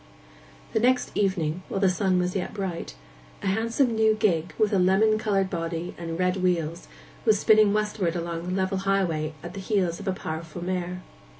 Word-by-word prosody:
The 220 - +2
next 250 +2 +2
evening, 180 -4 0
while 195 - -2
the 195 - +4
sun 185 0 +2
was 180 +1 0
yet 190 +2 -3
bright, 180 - -4 0.5
a - - -4
handsome 230 +5 +1
new 220 -1 +3
gig, 175 -6 +1
with 215 -1 +2
a 195 - +4
lemon 205 +4 +4
coloured 195 -3 +1
body 165 0 -3
and 165 -1 -5
red 180 +1 +1
wheels, 175 -3 -1 0.4
was 215 -2 +4
spinning 215 0 +5
westward 210 -4 0
along 170 0 -4
the 180 - -1
level 190 0 0
highway 175 -6 0
at - - -7
the 195 - -6
heels 190 -4 0
of 200 - -8
a - - +2
powerful 165 -1 -5
mare. 180 0 -3
185 Hz, 185 wpm, -26 LUFS, 170-205 Hz, 0.5 s, spinning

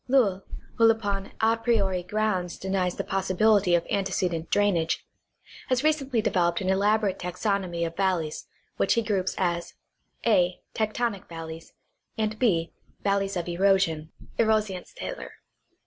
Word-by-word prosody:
Lowl, 225 -8 +3 0.4
who 230 0 +6
upon 205 -3 -1
a 225 +1 +4
priori 210 -6 +1
grounds 185 -2 -1
denies 190 -2 -1
the - - -3
possibility 195 0 +3
of 170 - +1
ante 195 -1 -1
cedent 170 -3 -1
drainage, 175 -6 +1 0.6
has 255 +1 +1
recently 275 -7 +1
developed 175 -5 +2
an 190 0 0
elaborate 205 0 +2
taxonomy 180 -1 -1
of 165 0 -5
valleys 180 -5 -1 0.3
which - - +2
he 230 - +2
groups 195 -3 -1
as 175 -2 -1 0.5
(a) 185 -6 +3
tectonic 220 -1 -1
valleys, 165 -1 -8 0.4
and 215 -1 0
(6) 170 -9 +2 0.3
valleys 200 -1 +1
of 175 - -3
erosion 175 -3 +2 0.3
(Erosionsthaler). 220 - -1
195 Hz, 130 wpm, -26 LUFS, 175-215 Hz, 0.6 s, who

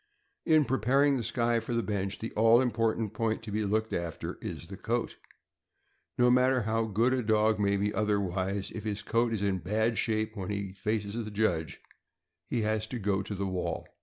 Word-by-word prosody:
In 155 -3 +5
preparing 135 +3 +3
the 120 - -2
Skye 120 0 +1
for 120 - -4
the 115 - +1
bench, 100 -2 -2
the 115 - -5
all 115 +2 +5
important 115 -3 0
point 110 +1 -1
to 110 - -7
be 105 +1 0
looked 110 +2 0
after 85 -2 -4
is 85 - -6
the 95 - -8
coat. 115 +4 -2 1.0
No 125 0 +5
matter 125 0 +3
how 110 +1 0
good 115 +4 +2
a 130 - +1
dog 110 -1 +2
may 100 -1 +2
be 105 +1 0
otherwise, 100 -1 -1
if 110 - -6
his 105 -2 -3
coat 115 0 +1
is 105 -3 -1
in 95 -2 +1
bad 110 +6 0
shape 110 -1 0
when 95 -1 -5
he 100 -2 -3
faces 105 +2 -2
the 110 - -6
judge, 100 -7 -1 0.7
he 120 - -1
has 110 0 0
to 125 - -4
go 100 -3 0
to 100 +1 -5
the 100 +1 -2
wall. 95 -1 -3
110 Hz, 195 wpm, -29 LUFS, 100-115 Hz, 1.0 s, In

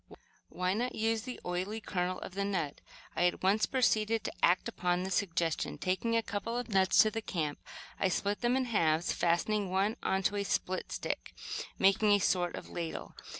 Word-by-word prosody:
"Why 185 0 -1
not 245 +4 -2
use 225 0 +1
the 250 +1 -7
oily 185 +5 -2
kernel 185 -3 -2
of - - -7
the 200 +1 -1
nut?" 180 -8 -2 0.3
I 175 - +2
at 175 - -3
once 200 +3 +3
proceeded 225 -4 +2
to - - -4
act 180 +2 +4
upon 180 0 0
this 190 0 -2
suggestion. 170 -4 0
Taking 190 +5 0
a 230 - +1
couple 220 +3 -3
of 245 -1 -4
nuts 190 -2 +5
to 215 - 0
the 225 - -3
camp, 155 -8 -3 0.4
I - - +3
split 200 +2 -1
them 245 +1 +2
in 260 - +1
halves, 170 -8 +2
fastening 190 +4 +1
one 195 +4 +1
into 195 +2 +1
a 200 - 0
split 185 -1 -2
stick, - - -4 0.4
making 195 +2 +4
a - - +6
sort 180 -3 +1
of - - -8
ladle. 170 -2 -5
195 Hz, 190 wpm, -32 LUFS, 180-215 Hz, 0.4 s, a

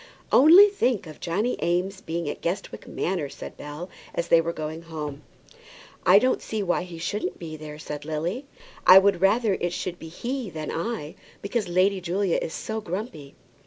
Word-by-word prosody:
"Only 340 +9 +9
think 255 - 0
of 155 -1 -11
Johnny 205 +9 -1
Eames 185 +3 0
being 170 0 -3
at 145 - -4
Guestwick 175 +3 -4
Manor!" 170 -6 -2
said - - -9
Bell, 150 +4 -7 0.3
as 170 - -2
they 165 - +6
were 165 +1 -2
going 155 0 -5
home. 150 -3 -6 0.9
"I 185 +2 +8
don't 255 +5 +2
see 215 -2 -3
why 180 -2 +1
he 175 -2 -8
shouldn't 205 +6 -3
be 160 -2 -7
there," 150 -1 -8
said 150 -1 -6
Lily. 165 - -3 0.4
"I 185 - +11
would 190 -2 +4
rather 210 +2 +3
it 175 -2 -2
should 175 0 -4
be 160 - -8
he 240 +7 -4
than 155 -3 -5
I, 170 -4 -3 0.3
because 205 +1 -1
Lady 185 +2 +2
Julia 180 +1 0
is - - -3
so 220 +5 -4
grumpy." 180 - -6
175 Hz, 180 wpm, -25 LUFS, 160-205 Hz, 0.9 s, I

